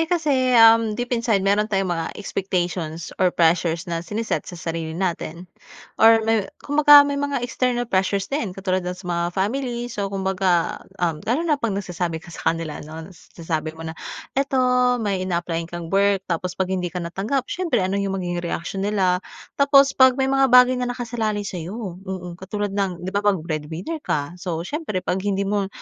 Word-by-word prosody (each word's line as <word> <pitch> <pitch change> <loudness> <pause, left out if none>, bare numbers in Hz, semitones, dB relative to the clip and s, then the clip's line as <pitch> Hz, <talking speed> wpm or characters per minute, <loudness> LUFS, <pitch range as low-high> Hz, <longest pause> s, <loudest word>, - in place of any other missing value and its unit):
Eh 325 - 0
kasi 275 -8 +2
uhm, 225 -1 +6
deep 245 0 -3
inside 230 -5 +1
meron 205 +2 +2
tayong 195 -3 0
mga 165 -1 -4
expectations 180 -5 -3
or 185 - +5
pressures 165 -1 +2
na 170 -1 -3
sine-set 210 +6 -3
sa 175 - -8
sarili 165 -1 -4
natin. 175 -2 -3 0.6
Or 225 0 +7
may 220 -3 +1 0.2
'kumbaga 290 0 +7
may 285 0 -2
mga 285 -3 -1
external 245 -1 0
pressures 195 -2 0
din 220 -10 -2
katulad 185 -1 0
ng 180 0 -4
sa 185 - -13
mga 170 0 0
family. 240 +3 -2
So 200 -3 -2
'kumbaga, 190 -3 0 0.2
uhm 165 -4 -1
lalo 285 +8 +1
na 300 -4 +1
'pag 215 -4 -1
nagsasabi 175 -4 -3
ka 170 - -12
sa - - -1
kanila 165 -2 -5
ano. 160 +4 -9
Sinasabi 160 -2 -5
mo 165 - -8
na, 160 - -4 0.4
'eto 275 -1 +1 0.4
may 200 -3 -1
ina-apply-an 170 -2 -2
kang 175 -1 -6
work 195 -1 +3
tapos 180 +1 -2
'pag 190 0 -1
hindi 180 -1 -1
ka 175 - -9
natanggap 210 +10 -2
siyempre 295 - 0
ano 195 +2 0
yung 195 -1 -1
magiging 175 -2 -3
reaksiyon 175 +3 -3
nila? 185 -3 +1 0.4
Tapos 280 -1 +6
'pag 260 -1 +5
may 265 - +1
mga 270 0 +4
bagay 250 0 +6
na 245 - -1
nakasalalay 230 -4 -2
sa'yo. 185 +1 -6
Mhm, 180 -2 -6
katulad 205 +1 -3
ng 195 -3 -2
di 185 - -4
ba 200 - +1
'pag 205 -2 +2
breadwinner 165 - -4
ka. 145 - -2
So 170 -3 -3
siyempre, 215 - -4
'pag 190 - -1
hindi 200 0 -1
mo 200 -1 0
195 Hz, 185 wpm, -22 LUFS, 175-235 Hz, 0.6 s, Or